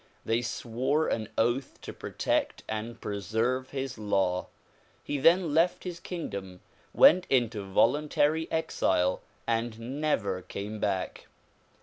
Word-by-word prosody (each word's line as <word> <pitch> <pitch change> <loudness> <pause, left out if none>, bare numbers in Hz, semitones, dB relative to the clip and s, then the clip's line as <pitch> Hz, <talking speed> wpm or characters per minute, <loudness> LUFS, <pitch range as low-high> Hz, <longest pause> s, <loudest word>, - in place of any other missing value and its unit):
They 115 +1 +1
swore 125 +5 -1
an 110 -1 -2
oath 120 +4 0
to - - -7
protect - - -1
and 110 +2 -4
preserve 110 +6 -1
his 135 -4 -4
law. 95 -3 0 0.6
He 145 - -2
then 165 +2 +4
left 165 +3 +2
his 175 -2 -5
kingdom, 100 - -6 0.3
went 180 +3 +6
into 120 -5 +1
voluntary 150 +6 +2
exile 95 - +1 0.3
and 115 +4 -2
never 100 -11 0
came 100 +4 -6
back. 95 -3 -2
120 Hz, 115 wpm, -29 LUFS, 105-145 Hz, 0.6 s, went